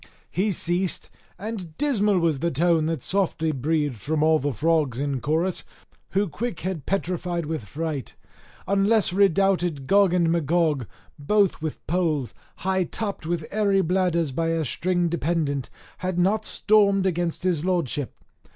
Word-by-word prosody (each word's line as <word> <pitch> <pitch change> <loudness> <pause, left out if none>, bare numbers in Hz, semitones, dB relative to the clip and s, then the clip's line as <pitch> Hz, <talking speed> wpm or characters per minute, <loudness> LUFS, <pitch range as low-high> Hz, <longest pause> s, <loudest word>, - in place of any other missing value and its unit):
He 205 +3 +1
ceased, 175 +1 -1 0.3
and 185 -5 -6
dismal 210 -9 +2
was 165 -5 +1
the 170 +4 0
tone 165 +1 +2
that 165 -1 -2
softly 180 -5 +1
breathed 145 -1 -1
from 150 +8 -1
all 160 0 +4
the 145 +2 -1
frogs 150 -2 +1
in 140 -2 -1
chorus, 165 +4 0 0.5
who 200 +2 +2
quick 210 +4 -4
had 175 -5 -4
petrified 180 -3 -1
with 155 -7 -4
fright, 145 +2 -4 0.5
unless 200 0 +2
redoubted 190 -6 +2
Gog 195 +4 +4
and 170 -2 +3
Magog, 160 - +1 0.3
both 200 +6 +2
with 155 -1 -5
poles, 155 - 0 0.3
high 190 -1 +2
topped 200 -4 -4
with 170 -2 -2
airy 200 -2 +2
bladders 175 -3 +1
by 165 +5 -1
a 165 -1 0
string 175 +6 0
dependent, 155 -4 -1 0.3
had 185 -1 -2
not 205 +5 +2
stormed 200 -2 +3
against 175 -2 -1
his 175 -5 +1
lordship. 170 -7 -1
170 Hz, 145 wpm, -24 LUFS, 155-190 Hz, 0.5 s, all